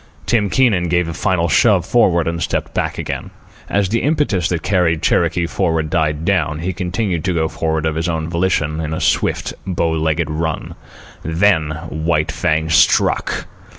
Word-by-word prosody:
Tim 105 -4 +1
Keenan 105 -9 +2
gave 90 0 +1
a 85 - -4
final 90 -1 0
shove 95 +2 +3
forward 90 -8 +2
and 85 0 -2
stepped - - -2
back - - -2
again. - - -4 0.4
As 100 -2 +1
the 115 +2 0
impetus 140 - +1
that 85 -2 -2
carried 90 -5 +1
Cherokee 90 - +2
forward 80 -3 -1
died 75 -1 0
down, 85 -6 +1
he 95 +2 -2
continued 90 -1 -2
to 90 -1 0
go 80 -1 +1
forward 80 -1 -2
of 80 - 0
his 80 +2 -2
own 80 -1 -2
volition, 85 -3 0
in 80 0 -3
a - - -3
swift, - - 0
bow 85 -3 0
legged 80 0 0
run. 80 0 -3 0.5
Then 80 -2 +1 0.2
White 80 0 0
Fang 80 -2 0
struck. - - +2
85 Hz, 170 wpm, -18 LUFS, 80-95 Hz, 0.5 s, shove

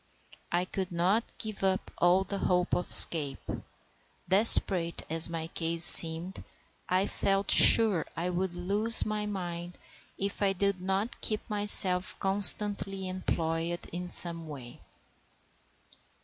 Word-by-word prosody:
I 175 +1 -3
could 185 0 -8
not 185 +6 -2
give 215 -3 -9
up 190 0 -4
all 180 +2 0
hope 180 -2 -4
of 180 - -4
escape, 145 -5 +5 0.8
desperate 185 -3 +3
as 165 +1 0
my 165 -1 -8
case 165 0 -1
seemed, 165 +3 +6
and - - -15 0.4
I 185 +2 -1
felt 195 0 -4
sure 210 -8 +5
I 175 +2 -5
would 180 0 -6
lose 205 +6 0
my 210 -1 -6
mind 175 -3 -9 0.4
if 200 +1 -7
I 195 -1 -1
did 200 -1 -3
not 195 +5 -6
keep 215 -1 -5
myself 195 -3 -2
constantly 195 0 +2
employed 170 -2 -6
in 180 +1 -9
some 170 -2 -1
way. 130 -5 -13
185 Hz, 125 wpm, -26 LUFS, 170-200 Hz, 0.8 s, seemed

